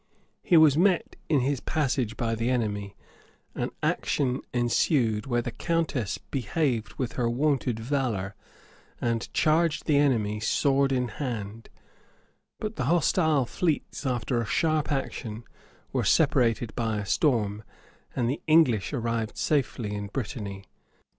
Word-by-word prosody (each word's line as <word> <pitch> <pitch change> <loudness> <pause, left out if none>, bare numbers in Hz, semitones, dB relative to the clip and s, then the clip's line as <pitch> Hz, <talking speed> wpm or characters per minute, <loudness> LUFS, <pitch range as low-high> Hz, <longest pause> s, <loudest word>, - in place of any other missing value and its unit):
He 175 - +4
was 155 -2 +6
met 185 -1 +2
in 145 -4 +3
his 135 +1 0
passage 130 -7 -1
by 115 -1 -1
the 115 +2 -1
enemy; 105 -5 -1 0.6
an - - -2
action 130 -2 0
ensued, 120 -2 +1
where 120 -2 0
the 120 - -4
countess 155 - -1
behaved 125 - -2
with 130 -3 -2
her 120 -2 +1
wonted 130 -2 0
valor, 115 -6 -1 0.7
and 115 -1 -1
charged 160 0 +2
the 150 -3 +3
enemy 110 -7 +2
sword 135 +5 +2
in 125 -2 +1
hand; 115 -3 -5 0.9
but 215 +1 -4
the 130 - -1
hostile 160 -2 +3
fleets, 160 +4 -2
after 125 -2 0
a - - -3
sharp 155 +1 +1
action, 120 -5 -3 0.5
were - - +1
separated 115 -1 +2
by 115 -3 -1
a 105 - -3
storm, 110 - +1 0.5
and 120 - 0
the 135 +5 -2
English 150 - +4
arrived 115 -3 -2
safely 125 -7 0
in 105 0 -4
Brittany. 100 -3 -5
125 Hz, 135 wpm, -27 LUFS, 110-145 Hz, 0.9 s, was